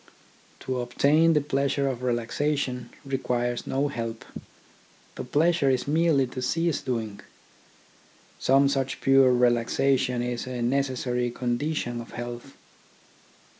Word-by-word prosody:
To 130 -1 -2
obtain 150 +7 +3
the 150 - +3
pleasure 140 0 0
of 130 -2 -3
relaxation 125 +2 -1 0.2
requires 120 -3 -2
no 140 +2 0
help. 115 -4 -5 0.9
The - - -6
pleasure 155 +2 +2
is 130 0 0
merely 155 -2 +3
to 125 +1 -7
cease 165 +5 0
doing. 110 -5 -3 1.2
Some 135 +1 +4
such 135 -1 -1
pure 135 -1 +5
relaxation 125 +1 +2
is 120 0 -3
a 125 -2 -3
necessary 125 -1 0
condi 125 +6 -2
tion 120 -4 -3
of 115 - -12
health. 120 +2 -7
130 Hz, 120 wpm, -26 LUFS, 120-140 Hz, 1.2 s, pure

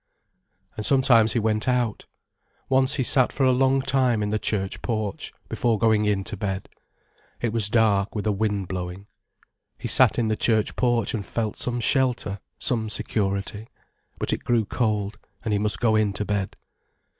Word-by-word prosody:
And 110 - -4
sometimes 120 -3 +4
he - - 0
went 110 0 0
out. 125 -3 0 0.6
Once 130 +1 +2
he 130 - 0
sat 130 0 +3
for 135 - -1
a 130 - +5
long 135 +1 +2
time 125 -6 +1
in 105 - -2
the 110 - 0
church 95 -3 -2
porch, 110 -4 -3 0.2
before 115 -2 0
going 110 -1 +3
in 100 -2 +1
to 105 - -4
bed. 95 -2 -4 0.7
It 115 -2 -2
was 110 -3 0
dark 105 -3 +2
with 105 - -3
a 105 - +2
wind 100 -2 -1
blowing. 90 +1 -5 0.7
He - - -5
sat - - +4
in 115 - +1
the 110 - +1
church 110 -1 +1
porch 120 -4 +1
and 105 - -2
felt 110 +1 -3
some 120 -1 -2
shelter, 120 -6 +1 0.2
some 115 -7 0
security. 100 0 -2 0.5
But - - -2
it - - -3
grew 115 -3 +1
cold, 105 -2 -1 0.2
and 110 - -1
he 100 - +2
must 105 0 -1
go 110 -3 +2
in 105 -2 +2
to 105 - -3
bed. 100 -2 -2
110 Hz, 180 wpm, -24 LUFS, 105-120 Hz, 0.7 s, a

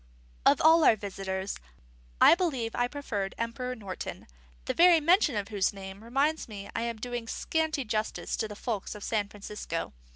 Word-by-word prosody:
Of - - +5
all 320 +1 +6
our 230 - +7
visitors, 195 -1 -4 0.6
I - - +9
believe 290 -11 0
I 245 - +1
preferred 215 -9 -4
Emperor 250 +2 -3
Norton; 200 -5 -7 0.4
the - - -1
very 345 -1 +7
mention 335 - +4
of 205 -1 -2
whose 205 -3 +1
name 195 +1 -9
reminds 280 +7 0
me 200 -3 -8
I - - 0
am 235 -1 -2
doing 240 0 -5
scanty 315 +1 -1
justice 215 0 -2
to 220 - -1
the 210 - -8
folks 215 -2 -4
of 210 - -9
San 210 -3 -1
Francisco. 200 - -5
225 Hz, 170 wpm, -29 LUFS, 200-280 Hz, 0.6 s, I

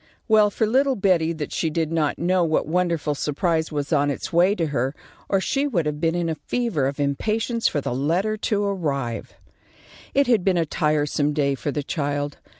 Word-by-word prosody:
Well 215 -2 +5
for 220 - 0
little 265 +4 +2
Betty 180 -5 +2
that 155 -2 -5
she 160 - 0
did 160 0 -1
not 155 -3 0
know 180 +1 +2
what 160 -2 +1
wonderful 170 -2 0
surprise 160 +3 -1
was 145 +1 -2
on 145 -1 +3
its 145 - -4
way 180 +4 +4
to 170 - 0
her, 135 -1 -1 0.3
or 195 - +3
she 275 +8 0
would 180 - 0
have 150 0 -3
been 165 0 +1
in 175 -1 0
a 165 - 0
fever 225 - 0
of 140 +2 -4
impatience 220 - 0
for 145 - -1
the 125 - -3
letter 170 +11 0
to 210 -1 -1
arrive. 140 - -3 0.8
It 280 +1 +4
had 235 -7 +3
been 185 -1 +2
a 165 - +2
tiresome 150 -1 0
day 140 -2 +1
for 145 +2 -3
the 145 0 -3
child. 145 -1 -2
165 Hz, 200 wpm, -23 LUFS, 145-195 Hz, 0.8 s, Well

